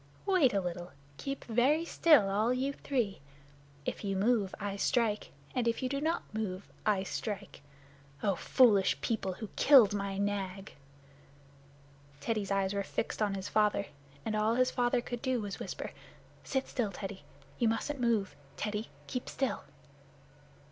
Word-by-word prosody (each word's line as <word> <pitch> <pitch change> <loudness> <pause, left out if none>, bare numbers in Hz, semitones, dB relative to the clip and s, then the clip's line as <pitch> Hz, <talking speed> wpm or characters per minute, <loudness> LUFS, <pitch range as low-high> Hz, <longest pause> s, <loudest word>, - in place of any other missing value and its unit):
Wait 370 -10 +4
a 200 - +2
little. 175 -1 -5 0.2
Keep 275 - -4
very 265 +8 +3
still, 305 -12 +5
all 210 +4 +2
you 265 +2 0
three! 240 - -2 0.6
If - - -3
you 195 -1 -1
move 205 -1 +2
I 200 -1 -3
strike, 215 +1 +1 0.2
and 245 -2 0
if 230 +3 0
you 255 - 0
do 275 +1 -2
not 325 +3 0
move 200 -3 -3 0.2
I 200 -3 +3
strike. 200 -2 -5 0.6
Oh, 200 - +3
foolish 195 - +4
people, 200 -2 -1
who 215 +3 -7
killed 250 -8 +7
my 200 -1 -2
Nag!" 195 -1 -2 1.5
Teddy's 210 +5 -1
eyes 195 0 +1
were 200 - 0
fixed 220 - -3
on 205 -2 +1
his 190 0 -4
father, 210 -1 +2 0.4
and 215 - -1
all 215 +2 +2
his 255 +1 +3
father 245 0 +2
could 240 -1 -5
do 260 -2 +1
was 205 -2 -4
to - - -18
whisper, - - -5 0.5
"Sit 265 -1 -1
still, 225 -6 -1
Teddy. 195 -2 -6 0.4
You 235 - +3
mustn't 260 +5 -2
move. 225 -5 +1 0.2
Teddy, 210 +1 -3 0.2
keep 250 - -4
still." 270 - -1
215 Hz, 155 wpm, -32 LUFS, 195-250 Hz, 1.5 s, killed